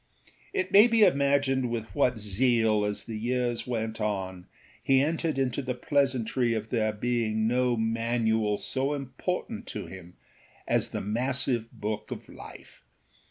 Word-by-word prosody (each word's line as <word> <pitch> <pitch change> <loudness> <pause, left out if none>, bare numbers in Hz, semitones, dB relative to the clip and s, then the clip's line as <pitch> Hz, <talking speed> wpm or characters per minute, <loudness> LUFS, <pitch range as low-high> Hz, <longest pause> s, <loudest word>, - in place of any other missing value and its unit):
It 385 -2 -2
may 210 +4 +8
be 230 -2 +4
imagined 140 -4 +3
with 115 -2 -3
what 130 -4 +2
zeal, 110 0 +2
as 105 0 -2
the 110 -2 -6
years 120 +1 -1
went 110 -2 -3
on, 95 -4 -3 0.3
he 135 -1 +4
entered 155 +1 0
into 135 0 0
the 125 -2 -3
pleasantry 125 -3 +1
of 110 0 -4
there 110 -3 +1
being 110 -1 0
no 125 0 +2
manual 110 -1 +1
so 135 +6 -2
important 180 - -4
to - - -5
him 90 -2 -11 0.5
as - - +1
the - - -4
massive 120 +1 -1
book 105 0 -4
of - - -7
life. - - -13
120 Hz, 145 wpm, -28 LUFS, 110-135 Hz, 0.5 s, may